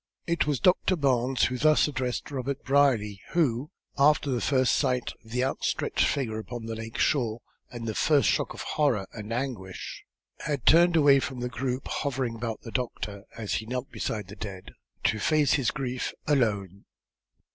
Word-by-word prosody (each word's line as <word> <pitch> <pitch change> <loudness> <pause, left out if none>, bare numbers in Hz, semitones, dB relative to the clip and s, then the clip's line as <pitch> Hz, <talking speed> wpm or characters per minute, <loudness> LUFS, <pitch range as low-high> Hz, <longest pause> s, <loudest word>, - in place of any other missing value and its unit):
It 170 -2 0
was 145 -4 +1
Doctor 185 +1 +3
Barnes 130 -4 +1
who 125 -1 +1
thus 155 +2 +4
addressed 130 -2 -3
Robert 135 0 -3
Brierly, 125 -8 +2
who, 145 -5 +1 0.3
after 145 0 +4
the 120 -2 0
first 130 -3 +2
sight 125 -1 0
of 110 - -17
the 125 +2 0
outstretched 135 - 0
figure 110 -6 -1
upon 120 +1 -7
the 115 - -4
lake 115 0 -6
shore, 120 -5 +1 0.3
and 120 -1 -7
the 110 - -1
first 145 +4 +3
shock - - 0
of - - -7
horror 135 -10 +1
and 105 0 -7
anguish, 115 -7 -4 0.4
had 140 -6 -3
turned 175 +1 +6
away 145 -3 +6
from 130 -1 -4
the 125 0 -2
group 125 +1 -3
hovering 130 -4 -2
about 115 -1 -4
the 115 - -9
doctor, 105 -5 -4
as 110 -3 -3
he 110 - -2
knelt 125 +2 -4
beside 105 -4 -3
the 100 - -10
dead, 100 -3 -7 0.3
to 110 - +2
face 150 +5 +3
his 135 -4 +2
grief 130 -3 -3
alone. 100 - 0
125 Hz, 175 wpm, -27 LUFS, 110-140 Hz, 0.4 s, turned